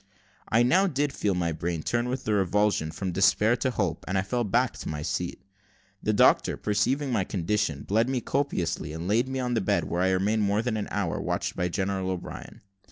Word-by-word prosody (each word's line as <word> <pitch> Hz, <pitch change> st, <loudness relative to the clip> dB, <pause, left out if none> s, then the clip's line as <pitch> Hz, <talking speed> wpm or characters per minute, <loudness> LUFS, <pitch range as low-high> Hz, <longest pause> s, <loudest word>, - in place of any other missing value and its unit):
I 115 Hz, +2 st, +4 dB
now 185 Hz, +11 st, +4 dB
did 145 Hz, -3 st, -1 dB
feel 100 Hz, -3 st, 0 dB
my 85 Hz, -2 st, 0 dB
brain 80 Hz, 0 st, -3 dB
turn 120 Hz, +1 st, 0 dB
with 130 Hz, +1 st, -3 dB
the 110 Hz, -, 0 dB
revulsion 100 Hz, -3 st, +1 dB
from 90 Hz, +4 st, -4 dB
despair 105 Hz, +5 st, +3 dB
to 130 Hz, -, 0 dB
hope, 95 Hz, -9 st, -2 dB
and 95 Hz, -, 0 dB
I 95 Hz, -, +1 dB
fell 120 Hz, +5 st, -1 dB
back 120 Hz, +4 st, 0 dB
in -, -, -4 dB
my 75 Hz, -1 st, -4 dB
seat. -, -, -3 dB, 0.6 s
The 110 Hz, -, +1 dB
doctor 105 Hz, -, +4 dB
perceiving 130 Hz, +7 st, 0 dB
my 110 Hz, -5 st, +1 dB
condition, 90 Hz, -5 st, -1 dB
bled 110 Hz, +5 st, +1 dB
me 130 Hz, -1 st, 0 dB
copiously, 120 Hz, -, -2 dB
and 80 Hz, +2 st, -5 dB
laid 115 Hz, +6 st, +2 dB
me 130 Hz, 0 st, -3 dB
on 125 Hz, -1 st, -1 dB
the 115 Hz, -, +1 dB
bed, 95 Hz, -, +1 dB
where 85 Hz, +1 st, -2 dB
I 95 Hz, -, +3 dB
remained 100 Hz, +4 st, +1 dB
more 105 Hz, +2 st, +1 dB
than 120 Hz, -2 st, -1 dB
an 105 Hz, -2 st, -3 dB
hour, 100 Hz, -5 st, -2 dB
watched -, -, -2 dB
by 90 Hz, -, 0 dB
General 95 Hz, +1 st, -2 dB
O'Brien. 90 Hz, -2 st, -6 dB
105 Hz, 215 wpm, -27 LUFS, 90-120 Hz, 0.6 s, I